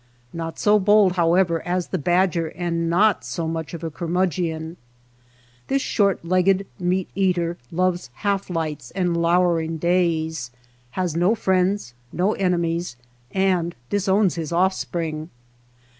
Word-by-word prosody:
Not 165 -1 -5
so 210 0 +4
bold, 205 -1 +5
however, 170 -1 +2
as 180 0 -2
the 185 - -2
badger 175 +1 +1
and 170 0 -2
not 195 - +3
so 125 +8 -3
much 160 0 -4
of 165 - -9
a 165 - -3
curmudgeon. 170 -1 -2 0.9
This 275 0 0
short 200 -5 +1
legged 185 +2 +2
meat 180 +1 0
eater 175 -3 0
loves 180 -3 0 0.2
half 200 -1 0
lights 155 -7 -3
and 180 -3 0
lowering 170 -1 +2
days, 160 -5 0 0.5
has 180 -4 -1
no 180 +6 +3
friends, 190 - 0 0.2
no 190 +4 +1
enemies, 170 -5 -1 0.4
and 185 -3 +1 0.2
disowns 200 -1 +2
his 165 -2 -4
offspring. 170 -3 -1
175 Hz, 130 wpm, -23 LUFS, 165-190 Hz, 0.9 s, bold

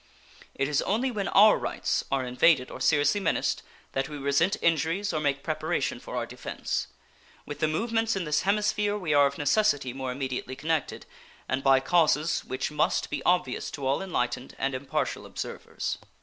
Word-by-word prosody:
It 135 - 0
is 145 -1 +1
only 240 +6 0
when 205 -4 -2
our 210 +2 +6
rights - - -1
are 135 -2 +1
invaded 125 +2 +3
or - - -8
seriously 150 +8 +3
menaced 165 - 0 0.3
that 135 +2 -2
we 150 - -6
resent 140 +7 +2
injuries 170 +5 +1
or 155 - 0
make 140 -2 -1
preparation - - -1
for - - -8
our - - -1
defense. - - -4 0.6
With 145 - -7
the 155 - +2
movements 225 +7 0
in 190 - -1
this 150 -2 +1
hemisphere 205 +1 +1
we 170 -7 -1
are 145 -1 +6
of 140 - -6
necessity 145 - +2
more 130 -1 -4
immediately 130 0 -4
connected, 155 +1 -2 0.4
and 130 +1 -1
by 135 -1 +5
causes 155 +1 +2
which 130 +3 -3
must 150 0 0
be - - -2
obvious 180 0 +1
to 140 - -6
all 135 +5 +1
enlightened 125 -8 -2
and 135 - -1
impartial 130 +1 -2
observers. - - -5
150 Hz, 175 wpm, -27 LUFS, 135-190 Hz, 0.6 s, our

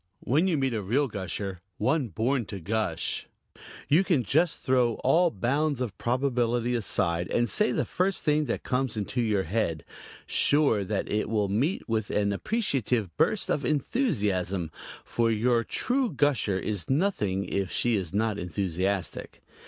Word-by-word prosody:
When 155 +9 +2
you 170 -4 +1
meet 135 -2 0
a 110 - -1
real 125 +9 +1
gusher 95 -3 -5 0.2
one 140 -1 +1
born 115 +5 0
to 100 -1 -6
gush 100 -2 -2 0.6
you 160 +6 +4
can 165 -10 +2
just 155 - +2
throw 125 -3 +2
all 175 +1 +4
bounds 140 - 0
of 120 -6 -3
probability 120 -1 0
aside 90 -7 0
and 120 0 +1
say 215 - +1
the - - 0
first 190 +1 -1
thing 150 0 +2
that 120 - -3
comes 125 -3 -1
into 110 +4 -1
your 105 -4 +1
head, 85 -4 -1 0.4
sure 140 -8 +3
that 95 +1 -2
it 105 0 -1
will 105 -3 +1
meet 130 - 0
with 110 -3 -1
an 100 -1 +1
appreciative 125 - -1
burst - - +1
of 145 - 0
enthusiasm, 100 - 0 0.3
for 115 -1 +1
your 115 +2 +2
true 255 - 0
gusher 135 - +1
is 100 0 -3
nothing 130 - 0
if 100 -2 -2
she 120 -2 +2
is 95 -5 -2
not 105 +1 0
enthusiastic. 95 +1 -3
115 Hz, 155 wpm, -27 LUFS, 100-140 Hz, 0.6 s, you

